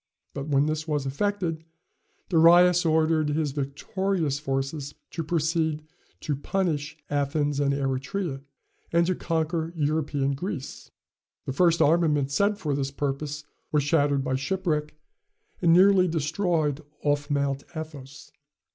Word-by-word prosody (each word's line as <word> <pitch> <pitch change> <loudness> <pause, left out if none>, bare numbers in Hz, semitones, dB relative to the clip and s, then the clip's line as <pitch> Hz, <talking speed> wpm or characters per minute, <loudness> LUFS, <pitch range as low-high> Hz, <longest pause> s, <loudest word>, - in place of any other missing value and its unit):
But 140 0 -5
when 140 -1 +3
this 155 +1 -2
was 150 -3 -1
effected, 165 +2 -1 0.7
Darius 175 +1 +6
ordered 155 -1 +2
his 150 -1 0
victorious 150 +3 -2
forces 135 +1 -3 0.2
to 165 - -3
proceed 160 -1 0 0.4
to 150 - -1
punish 155 -1 -2
Athens 145 0 0
and 140 -1 +2
Eretria, 140 +3 -2 0.5
and 170 0 +3
to 185 - +1
conquer 165 -1 -1
European 145 -2 0
Greece, 145 -1 -6 0.6
The 135 - -3
first 170 +3 +4
armament 150 -3 +2
sent 200 +7 +2
for 150 -7 -2
this 135 -1 -1
purpose 145 +2 -3 0.3
was 150 -2 +2
shattered 145 -2 +2
by 130 -2 0
shipwreck, 150 -1 -2 0.7
and 170 -2 +4
nearly 185 +1 +6
destroyed 160 -2 0 0.2
off 145 0 0
Mount 140 -1 0
Athos. 145 -4 -8
150 Hz, 125 wpm, -26 LUFS, 140-165 Hz, 0.7 s, Darius